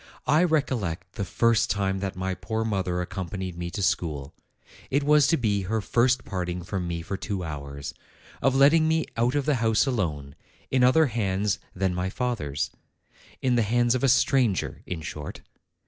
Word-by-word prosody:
"I 150 +6 +4
recollect 110 - -1
the 105 - -3
first 115 +3 +2
time 95 -1 0
that 95 -1 -3
my 95 +1 -2
poor 110 +4 -3
mother 95 -4 -1
accompanied 95 0 -5
me 85 0 -4
to 100 - -4
school. 80 -5 -1 0.6
It 140 +2 +1
was 150 -1 +5
to 165 - +3
be 105 -5 +1
her 110 0 +1
first 125 +4 +2
parting 90 -1 -3
from 90 0 -3
me 85 -1 -3
for 100 +4 -4
two 100 -2 -3
hours; 70 -3 -6 0.5
of 135 +1 +2
letting 150 +4 +5
me 160 0 +2
out 120 +4 +1
of 145 -2 +1
the 150 - +3
house 110 +2 +3
alone, 80 - -2 0.4
in 130 -1 +3
other 145 +6 +6
hands 105 -5 0 0.2
than 95 0 0
my 90 +1 -1
fath 125 +1 -2
er's; 70 -1 -2 0.7
in 130 -1 +3
the - - +4
hands 120 +2 +2
of 130 - -1
a 135 - +4
stranger, 125 -5 +2
in 85 -3 -4
short. 75 -1 -7
100 Hz, 180 wpm, -26 LUFS, 90-125 Hz, 0.7 s, other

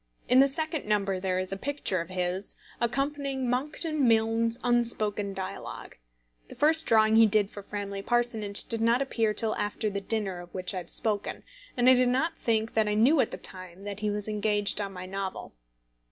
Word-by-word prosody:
In 250 - +5
the 275 - +7
second 315 -1 -3
number 200 -3 0
there 185 -1 -1
is 185 +1 -2
a - - -4
picture 265 -7 -1
of 170 - -8
his 185 +1 -3 0.2
accompanying 275 +2 -1
Monckton 290 +3 0
Milne's 225 +1 +2
Unspoken 220 -4 +1
Dialogue. 190 0 -7 0.5
The - - -11
first 315 +2 +4
drawing 220 0 +4
he 225 0 +7
did 205 -1 +2
for 205 - -8
Framley 200 0 -5
Parsonage 225 -3 0
did 225 -1 -2
not 235 +4 +3
appear 225 -5 0
till 220 +1 +1
after 210 +1 -2
the 200 0 -3
dinner 195 -3 -1
of 175 0 -11
which 185 +1 -1
I - - -4
have 170 - -11
spoken, 210 -2 -1 0.3
and 245 0 +3
I 260 - +9
do 255 0 +3
not 315 +7 0
think 225 -1 -1
that 220 -1 +2
I 210 - 0
knew 260 +8 +4
at 245 - +3
the - - -6
time 185 0 -9
that 205 0 -6
he 210 0 -1
was 205 0 -1
engaged 210 -1 0
on 200 -1 -4
my 185 -1 -8
novel. 190 - -5
215 Hz, 195 wpm, -28 LUFS, 200-245 Hz, 0.5 s, I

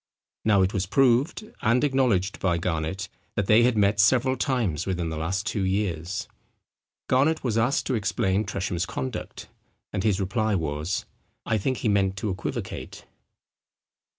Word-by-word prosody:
Now 100 -3 +4
it 95 - 0
was 95 -2 -1
proved, 135 - +2 0.2
and 120 +5 +3
acknowledged 125 -9 +1
by 90 -3 +1
Garnet, 85 +2 -2 0.3
that 100 - 0
they 105 +4 +6
had 120 -1 +3
met 100 0 +3
several 130 +5 +4
times 120 - -1
within 90 -3 -1
the 80 - -4
last 90 +6 -2
two 105 -1 -1
years. 95 -2 -1 0.8
Garnet 145 +5 +2
was 120 -5 0
asked 115 +4 +1
to 130 - -1
explain 100 -2 +1
Tresham's 95 -3 -2
conduct; 120 +5 -5 0.5
and 100 -2 -1
his 105 -3 +2
reply 110 +2 0
was, 80 +1 -2 0.4
"I 110 -1 +1
think 130 +5 -1
he 120 - -2
meant 95 -2 +2
to 100 +1 -2
equivocate." 90 - -5
100 Hz, 150 wpm, -26 LUFS, 95-120 Hz, 0.8 s, they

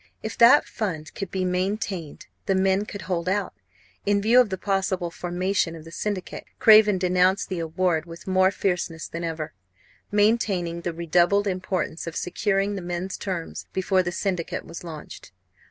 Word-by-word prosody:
If 220 - -4
that 240 +5 +7
fund 160 -7 -4
could 195 - -5
be 185 0 -2
maintained, 185 -3 -2 0.2
the 195 - +2
men 190 +2 +2
could 205 -2 -7
hold 180 -1 -2
out. 195 0 -1 0.5
In 205 0 +2
view 230 +5 +6
of 240 - 0
the 190 - -3
possible 190 -2 -1
formation 180 0 -1
of 160 - -10
the 165 - -12
syndicate, 200 +1 -4
Craven 215 -2 +7
denounced 185 +1 +2
the 185 -3 -3
award 165 0 0
with 165 0 -10
more 185 0 +4
fierceness 180 -4 -2
than 170 +1 -6
ever, 160 -2 -4 0.6
maintaining 205 -5 +1
the 175 - -2
redoubled 175 +4 +2
importance 185 -3 -2
of 165 - -5
securing 195 +2 0
the 195 - -4
men's 175 +2 -4
terms 180 -4 -5
before 190 0 +2
the 175 -1 -3
syndicate 180 -2 -2
was 170 - -9
launched. 155 - -9
185 Hz, 165 wpm, -25 LUFS, 170-200 Hz, 0.6 s, that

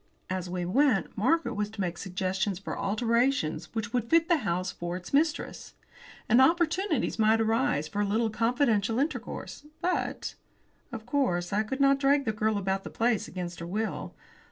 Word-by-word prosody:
As 185 -1 -3
we 180 -1 -2
went, 255 +3 +2
Margaret 255 +4 +1
was 210 -1 -2
to 220 0 -13
make 175 -3 -1
suggestions 190 +1 -2
for 200 - -5
alterations 225 - +1
which 220 -1 -3
would 240 -2 -1
fit 330 +1 +4
the 345 - +5
house 185 - -1
for 175 0 -4
its 180 +6 -11
mistress. 310 +3 0 0.5
And 240 +3 +5
opportunities 335 - +2
might 220 +1 +4
arise 225 - +1
for 200 +7 -2
a - - +2
little 220 +2 +1
confidential 230 -2 +1
intercourse. 285 +1 -3 0.2
But, 360 - -2 0.6
of 220 -1 -7
course, 200 -10 0
I 210 - +3
could 240 +5 -4
not 275 0 +5
drag 280 0 +3
the 220 - +1
girl 215 0 0
about 195 0 -1
the - - -7
place 230 -2 0
against 175 -2 -6
her 170 - -6
will. 215 +5 -3
220 Hz, 175 wpm, -28 LUFS, 190-265 Hz, 0.6 s, the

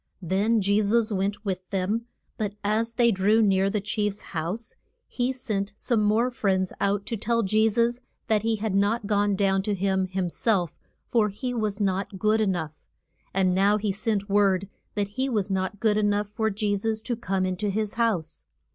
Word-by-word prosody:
Then 205 +6 +2
Je 200 +2 +3
sus 220 +2 +2
went 200 +2 -2
with 185 -2 -3
them. 205 +5 -1 0.3
But 210 -2 -3
as 220 +3 0
they 235 -1 +4
drew 205 +3 +3
near 195 -2 +3
the 210 +1 0
chief's 210 0 -2
house 175 +8 -3 0.3
he 245 +1 -1
sent 210 -6 -3
some 225 +1 0
more 225 +4 +2
friends 190 -5 0
out 200 0 +1
to 230 - -2
tell 230 +2 0
Je 215 +3 +3
sus 235 +2 +1 0.3
that 215 -2 +2
he 225 +1 +1
had 215 -1 -2
not 205 +3 +1
gone 205 -1 +2
down 195 -1 +2
to 205 +1 -1
him 190 0 0
him 185 -1 -2
self, 180 -2 0 0.3
for 220 -3 +2
he 245 +5 -4
was 215 -3 -2
not 195 -1 -1
good 215 +3 +2
e 215 - +2
nough. 165 -5 -2 0.6
And 185 -1 +2
now 200 +3 +3
he 210 -1 -1
sent 210 0 -1
word 195 -2 +2 0.3
that 205 -1 -1
he 265 +1 +1
was 210 -5 -1
not 190 +1 -2
good 215 -1 +2
e - - +2
nough 205 0 +1
for 220 +1 0
Je 205 0 0
sus 220 +2 -2
to 240 - -2
come 195 -4 -1
in 185 0 -1
to 210 +1 -1
his 210 +1 -1
house. 210 -9 -1
205 Hz, 200 wpm, -26 LUFS, 195-220 Hz, 0.6 s, they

